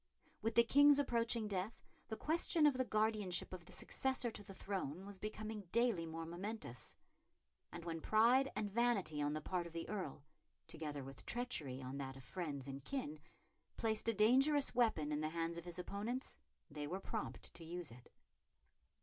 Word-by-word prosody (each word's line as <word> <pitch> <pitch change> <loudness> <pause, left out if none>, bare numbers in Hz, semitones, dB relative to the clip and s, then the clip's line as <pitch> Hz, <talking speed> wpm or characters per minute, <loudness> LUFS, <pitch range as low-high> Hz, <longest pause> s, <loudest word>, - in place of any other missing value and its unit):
With 225 +1 0
the 235 - +8
King's 285 +4 +7
approaching 235 -5 +2
death 200 +2 -3 0.2
the 220 - -4
question 320 0 +3
of 295 - +7
the 255 0 +1
guardianship 215 -6 0
of 175 -2 -7
the - - -14
successor 260 -3 0
to 215 - -3
the 200 - -10
throne 190 -3 -3
was 200 -1 -8
becoming 215 -1 -5
daily 230 -8 +3
more 165 0 -4
momentous; 175 - -6 0.8
and 170 - -7
when 165 -1 -3
pride 240 +8 +5
and 205 -2 -1
vanity 210 -9 +2
on 145 0 +1
the 155 - -2
part 175 +1 -1
of 165 - -12
the 165 0 -4
Earl, 185 -9 -4 0.4
together 150 -3 -5
with 135 +1 -9
treachery 150 - 0
on 130 +2 -5
that 135 -1 -5
of 135 - -11
friends 145 -4 -4
and 135 0 -6
kin, 205 - -3 0.6
placed 220 -1 +1
a 230 - +4
dangerous 270 +7 +5
weapon 220 -12 +2
in 150 0 0
the 155 - 0
hands 165 +1 -2
of 170 - -11
his 175 0 -6
opponents, 205 - -3 0.3
they 145 0 -4
were 185 +5 -2
prompt 220 +2 -4
to 170 - -10
use 170 -3 -4
it. 120 +1 -14
195 Hz, 180 wpm, -39 LUFS, 160-230 Hz, 0.8 s, the